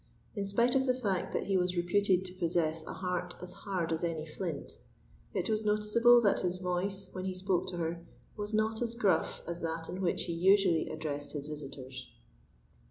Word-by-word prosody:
In 200 -2 -1
spite 235 +5 +3
of 265 0 +3
the 255 - +3
fact 190 -6 -1
that - - -1
he 195 -1 +2
was 180 0 0
reputed 185 +1 +2
to 180 - -5
possess 165 -3 0
a - - -5
heart 180 -1 -3
as 180 0 -7
hard 180 -5 -2
as 160 - -2
any 165 -2 -1
flint, 160 -1 -5 0.6
it 180 - 0
was 220 0 0
noticeable 215 +3 +5
that 205 -3 +3
his 180 0 -1
voice, 185 +2 -2
when 185 0 -5
he 190 -1 -2
spoke 185 -1 0
to 180 -1 -4
her 170 0 -2 0.3
was 210 0 -4
not 220 +1 +1
as 235 -1 -1
gruff 210 -6 +1
as 170 0 -5
that 165 0 -3
in 185 +2 -4
which 180 - +1
he 170 - -3
usually 185 -1 +4
addressed 145 -2 -4
his 145 -2 -4
visitors. 135 -4 -7
180 Hz, 195 wpm, -32 LUFS, 165-200 Hz, 0.6 s, noticeable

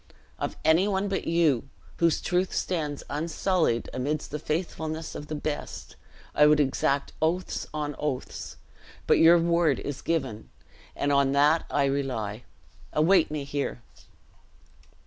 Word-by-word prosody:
Of - - -3
any 165 +5 +4
one 200 0 0
but 195 - -2
you, 160 -7 +2 0.3
whose 165 -2 +2
truth 180 +1 0
stands 150 -5 -2
unsullied, 160 -3 0
amidst 145 +4 -2
the 150 - -3
faithlessness 160 0 -3
of 150 - -7
the 155 - -4
best, 150 0 -5 0.4
I 150 - +6
would 150 0 +5
exact 140 0 0
oaths 170 +4 -1
on 150 -1 -3
oaths; 140 -4 -4 0.5
but - - +4
your 170 +1 +8
words 170 -4 +2
is 145 -1 -5
given, 130 - -2 0.5
and 145 - 0
on 140 -1 +3
that 150 +3 +3
I 140 - +2
rely. 125 -6 -2 0.5
Await 165 +3 +4
me 150 -1 -3
here." 140 -3 -3
150 Hz, 135 wpm, -27 LUFS, 140-165 Hz, 0.5 s, your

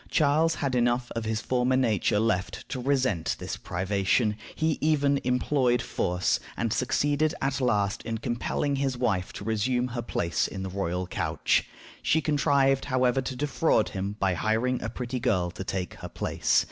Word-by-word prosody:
Charles 155 +2 +3
had 140 -2 -2
enough 120 0 +1
of 115 -1 -2
his 110 0 -1
former 125 0 +1
nature 110 -5 +2
left 105 -4 -1
to 130 - -3
resent 130 - +1
this - - -5
privation. 100 +4 0 0.2
He 160 -1 0
even 145 -2 +2
employed 125 0 +2
force, 90 -5 0 0.2
and 115 -2 0
succeeded 145 +5 +1
at 135 0 -1
last 105 -4 +1
in 115 -1 -3
compelling 125 +4 -1
his 135 -2 -1
wife 100 -7 0
to - - -7
resume 120 +4 0
her 120 0 -3
place 85 -7 -1
in 95 - -6
the 95 - -4
royal 90 -1 -2
couch. 90 - 0 0.4
She 160 - +3
contrived, 140 -2 +2
however, 130 -1 +2
to 130 0 -4
defraud 145 -3 +1
him 100 +2 -4
by 95 -2 +2
hiring 110 +7 0
a - - -3
pretty 125 0 -4
girl 90 -7 +1
to 95 - -6
take 95 -2 -3
her - - -8
place. - - +1
125 Hz, 170 wpm, -27 LUFS, 105-135 Hz, 0.4 s, Charles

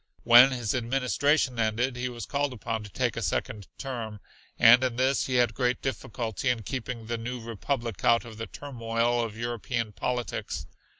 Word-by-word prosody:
When 120 +3 +9
his 120 -5 -2
administration 130 +2 +1
ended 115 +3 0
he 125 +1 -2
was 120 -3 -6
called 140 -1 -1
upon 110 -1 -4
to 105 - -9
take - - -1
a - - -3
second 105 -3 -2
term, 115 -6 -5 0.4
and 120 +3 +7
in 125 -2 0
this 130 +2 +1
he 130 - -1
had 120 -3 +3
great 125 +1 0
difficulty 120 -2 -3
in 120 -3 0
keeping 125 -1 -5
the 115 +1 -3
new 125 +2 -4
republic 115 0 -4
out 115 0 +4
of 110 -2 -10
the 115 - -4
turmoil 120 -3 -1
of 110 -1 -5
European 115 -1 -3
politics. 120 +4 -3
120 Hz, 175 wpm, -27 LUFS, 115-125 Hz, 0.4 s, When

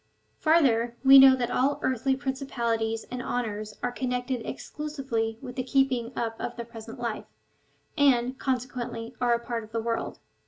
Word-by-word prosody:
Farther, 240 -8 +3
we 270 0 +10
know 265 -1 +9
that 245 -2 -2
all 275 +3 +2
earthly 260 +1 +1
prin 265 0 -2
cipalities 230 -4 -2
and 250 0 -3
honours 215 -4 -3
are 245 - 0
connected 250 -1 -2
exclusively 265 -7 -3
w^ith 250 -2 -6
the 255 - -1
keeping 255 -2 +1
up 225 -1 -2
of 240 - -4
the 235 - -6
present 230 +1 -10
life, 235 -3 -3 0.7
and, 255 -3 +3
consequently, 250 -2 -3
are 240 -1 +3
a - - -2
part 235 -1 -3
of 215 - -14
the 230 - -1
world. 230 0 -3
245 Hz, 165 wpm, -27 LUFS, 230-265 Hz, 0.7 s, we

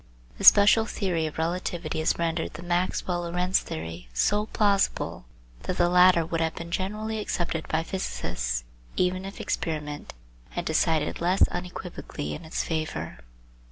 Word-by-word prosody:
The - - -5
special 210 +2 +8
theory 175 -8 -1
of 155 - -8
relativity 170 -1 -2
has 155 - +1
rendered 165 -1 -1
the 170 - -8
Maxwell 175 0 0
Lorentz 180 +2 +1
theory 80 -6 -7
so 210 - +2
plausible, 200 - +1 0.4
that 185 - -3
the 175 0 +4
latter 180 -1 +6
would 165 0 -2
have 160 0 0
been 170 0 -7
generally 215 +4 -2
accepted 170 -5 -2
by 160 +1 0
physicists - - -3 0.3
even 185 +1 0
if 195 - -8
experiment 150 - -3 0.3
had 175 - -4
decided 160 0 +1
less 180 +3 +4
unequivocally 175 - -5
in 75 - -8
its 160 - -2
favour. 155 - -3
170 Hz, 145 wpm, -27 LUFS, 160-185 Hz, 0.4 s, special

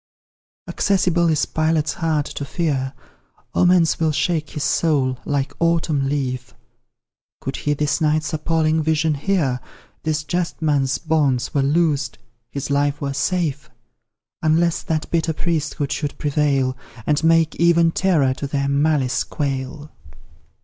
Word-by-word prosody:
Accessible 175 -3 +2
is 155 -2 +2
Pilate's 155 -2 0
heart 155 -3 0
to - - -6
fear, 140 -3 -1 0.6
Omens 180 -2 +3
will 160 -1 +2
shake 155 +1 0
his 150 - -4
soul, 135 -8 +1
like 140 -1 -1
autumn 165 -5 +1
leaf; 130 -3 -3 0.8
Could 135 - -4
he 145 0 0
this 150 +1 0
night's 155 -1 +1
appalling 160 0 +1
vision 160 0 +1
hear, 145 -5 0 0.4
This 155 -1 -1
just 175 +1 -2
man's 140 -4 +1
bonds 150 -6 0
were 140 - +2
loosed, 145 -1 +1 0.3
his 140 0 -4
life 145 0 +1
were 140 -1 -3
safe, 155 -2 -1 0.7
Unless 165 +2 +2
that 155 -1 -1
bitter 165 -1 +1
priesthood 150 -3 -2
should 145 -3 -3
prevail, 140 -3 +1 0.3
And 150 +1 +1
make 165 -1 +3
even 170 -1 +4
terror 160 -9 +2
to 140 - -5
their 140 0 -1
malice 140 -2 +1
quail. 140 +1 -4
150 Hz, 130 wpm, -21 LUFS, 140-165 Hz, 0.8 s, even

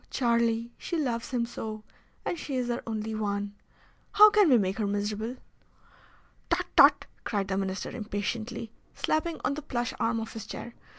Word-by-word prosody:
Charlie, 235 -1 +1
she 340 - -3
loves 240 -6 -1
him 245 -3 0
so, 220 -2 -6 0.4
and - - 0
she 275 - -4
is 245 -1 0
our 240 - -2
only 220 0 -3
one! 205 -1 -2 0.6
How 425 +1 +9
can 415 -5 +5
we 255 - +7
make 195 0 0
her 210 - +1
miserable?" 210 +4 -2 1.1
"Tut, - - +1
tut!" - - +7 0.2
cried 200 -3 -1
the 190 - 0
Minister 190 0 -2
impatiently, 220 +1 -4 0.2
slapping 315 +1 0
on - - +2
the 300 - -5
plush 245 -4 -2
arm 230 0 +1
of 225 0 -6
his 220 -1 -7
chair. 235 +1 -7
230 Hz, 170 wpm, -28 LUFS, 210-245 Hz, 1.1 s, How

